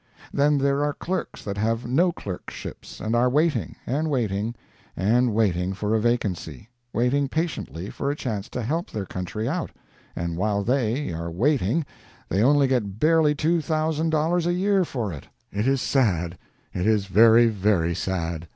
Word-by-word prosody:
Then 145 Hz, +1 st, +3 dB
there 140 Hz, +1 st, +1 dB
are 145 Hz, -1 st, -1 dB
clerks 185 Hz, +1 st, -4 dB
that 100 Hz, -1 st, -4 dB
have 115 Hz, +3 st, 0 dB
no 165 Hz, +9 st, +3 dB
clerkships, 95 Hz, -, -8 dB
and 110 Hz, +2 st, -1 dB
are 125 Hz, +2 st, +4 dB
waiting, 145 Hz, -, +1 dB
and 150 Hz, +5 st, -1 dB
waiting, 115 Hz, -4 st, -1 dB, 0.4 s
and 115 Hz, +6 st, +3 dB
waiting 95 Hz, -4 st, +1 dB
for 105 Hz, +2 st, -2 dB
a 110 Hz, -, +3 dB
vacancy 105 Hz, -, -2 dB, 0.2 s
waiting 130 Hz, +5 st, +1 dB
patiently 155 Hz, -, -3 dB
for 140 Hz, -, -3 dB
a 145 Hz, -, -1 dB
chance 110 Hz, -8 st, -4 dB
to 125 Hz, -, -4 dB
help 165 Hz, -, -2 dB
their 105 Hz, -3 st, -4 dB
country 100 Hz, +5 st, -4 dB
out 165 Hz, +5 st, -2 dB, 0.5 s
and 85 Hz, -1 st, -3 dB
while 100 Hz, +1 st, 0 dB
they 125 Hz, -, 0 dB
are 85 Hz, +1 st, -4 dB
waiting, 130 Hz, -, +1 dB, 0.4 s
they 95 Hz, -, +1 dB
only 140 Hz, +4 st, +5 dB
get 110 Hz, -6 st, -1 dB
barely 155 Hz, 0 st, +4 dB
two 165 Hz, +3 st, +1 dB
thousand 155 Hz, 0 st, 0 dB
dollars 165 Hz, +2 st, +1 dB
a 175 Hz, -, +2 dB
year 195 Hz, +1 st, +2 dB
for 120 Hz, -, -3 dB
it. 70 Hz, -, -9 dB, 0.2 s
It 105 Hz, +5 st, -1 dB
is 135 Hz, -1 st, +2 dB
sad 90 Hz, -, +1 dB, 0.4 s
it 90 Hz, +3 st, -1 dB
is 105 Hz, -3 st, +3 dB
very, 115 Hz, +4 st, +6 dB
very 100 Hz, -6 st, +1 dB
sad. 85 Hz, -2 st, -3 dB
120 Hz, 170 wpm, -24 LUFS, 100-145 Hz, 0.5 s, very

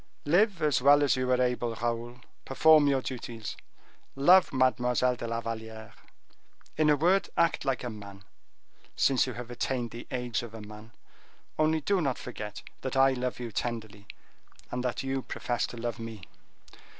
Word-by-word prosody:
Live 185 Hz, +4 st, +2 dB
as 145 Hz, -5 st, +2 dB
well 145 Hz, +2 st, +6 dB
as 140 Hz, -, +3 dB
you 130 Hz, 0 st, -1 dB
are 125 Hz, 0 st, +3 dB
able, 125 Hz, -2 st, 0 dB
Raoul, 120 Hz, +2 st, -3 dB, 0.2 s
perform 155 Hz, +2 st, +5 dB
your 135 Hz, -2 st, +1 dB
duties, 115 Hz, -3 st, -6 dB, 0.6 s
love 175 Hz, +7 st, +5 dB
Mademoiselle 125 Hz, -1 st, +2 dB
de 115 Hz, -, -6 dB
la 115 Hz, 0 st, -2 dB
Valliere; 110 Hz, -1 st, -7 dB, 0.8 s
in 155 Hz, -1 st, +3 dB
a 150 Hz, -, +5 dB
word, 180 Hz, +7 st, +2 dB
act 170 Hz, -3 st, +2 dB
like 135 Hz, -3 st, -1 dB
a 125 Hz, -, -3 dB
man, 100 Hz, -2 st, -11 dB, 0.7 s
since 135 Hz, -1 st, +3 dB
you 125 Hz, -, -4 dB
have 120 Hz, 0 st, -8 dB
attained 120 Hz, -1 st, -2 dB
the 120 Hz, -, -9 dB
age 125 Hz, -2 st, -2 dB
of 115 Hz, -2 st, -9 dB
a 110 Hz, -, -8 dB
man; 105 Hz, +2 st, -12 dB, 0.7 s
only 155 Hz, 0 st, +2 dB
do 195 Hz, +4 st, +1 dB
not 135 Hz, -5 st, -1 dB
forget 105 Hz, -4 st, -7 dB, 0.2 s
that 130 Hz, 0 st, -3 dB
I 135 Hz, 0 st, +6 dB
love 125 Hz, -1 st, -3 dB
you 120 Hz, -2 st, -5 dB
tenderly, 110 Hz, -3 st, -4 dB, 0.6 s
and 125 Hz, 0 st, -3 dB
that 125 Hz, +1 st, -2 dB
you 135 Hz, 0 st, -2 dB
profess 120 Hz, -1 st, -2 dB
to 120 Hz, -, -9 dB
love 115 Hz, -1 st, -4 dB
me." 115 Hz, -4 st, -8 dB
125 Hz, 170 wpm, -29 LUFS, 115-135 Hz, 0.8 s, well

